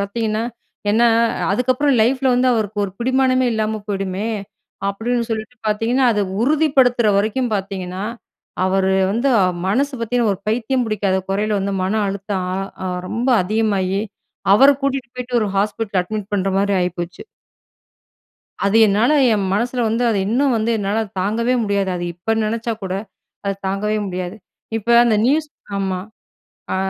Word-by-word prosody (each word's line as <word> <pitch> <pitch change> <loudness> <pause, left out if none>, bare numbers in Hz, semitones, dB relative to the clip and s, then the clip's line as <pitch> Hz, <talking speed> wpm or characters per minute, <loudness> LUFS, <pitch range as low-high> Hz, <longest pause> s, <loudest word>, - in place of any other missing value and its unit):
பார்த்தீங்கன்னா, 215 +2 -1 0.5
ஏன்னா, 235 +3 +4 0.4
அதுக்கப்புறம் 255 +5 +2
லைஃப்புல 260 +2 +2
வந்து, 250 +1 +3
அவருக்கு 215 -2 -1
ஒரு 190 - -6
பிடிமானமே 255 +1 +2
இல்லாம 220 -1 -1
போயிடுமே. 195 +1 -2 0.6
அப்படின்னு 235 +5 -1
சொல்லிட்டு 220 +3 -4
பார்த்தீங்கன்னா, 225 +5 +1
அத 210 - 0 0.2
உறுதிப்படுத்துற 265 -5 +3
வரைக்கும் 220 +4 0
பார்த்தீங்கன்னா, 190 -2 -4 0.6
அவரு 190 0 +2 0.2
வந்து, 240 +5 +1
அ - - +4 0.2
மனசு 280 +8 +1
பார்த்தீங்கன்னா, 230 -1 +1
ஒரு 190 - -14
பைத்தியம் 245 +3 0
பிடிக்காத 200 -3 0
குறையில 210 +1 0
வந்து, 195 0 -2
மன 190 +3 -1
அழுத்தம் 195 -1 -3
அ - - -2 0.3
அ - - -1 0.2
ரொம்ப 240 +4 -2
அதிகமாகி, 200 -1 0 0.5
அவர 270 +6 +7
கூட்டிட்டு 270 -2 -1
போய்ட்டு, 250 -1 -1
ஒரு 210 - -1
ஹாஸ்பிட்டல்ல 205 -1 0
அட்மிட் 210 +2 -5
பண்ணுற 195 -1 0
மாரி 200 0 +1
ஆயிப்போச்சு. 180 0 -4 1.4
அது 200 +2 +3
என்னால 215 +7 +3 0.2
என் 200 -2 0
மனசுல 240 +5 0
வந்து, 230 +2 0
அது 210 - +1
இன்னும் 260 +3 +2
வந்து 220 +1 0
என்னாலத் 205 +1 -2
தாங்கவே 230 +6 +1
முடியாது. 200 -2 0
அது 175 - -4
இப்ப 180 +6 -1
நினைச்சா 230 +2 -2
கூட, 190 -1 -3 0.5
அத 200 - 0
தாங்கவே 205 +3 -1
முடியாது. 180 +1 -4 0.4
இப்ப 220 +1 -11 0.2
அந்த 230 -3 +3
நியூஸ், 300 +4 +2 0.3
ஆமா. 190 -2 -1 0.8
ஆ - - 0
215 Hz, 145 wpm, -20 LUFS, 195-245 Hz, 1.4 s, அவர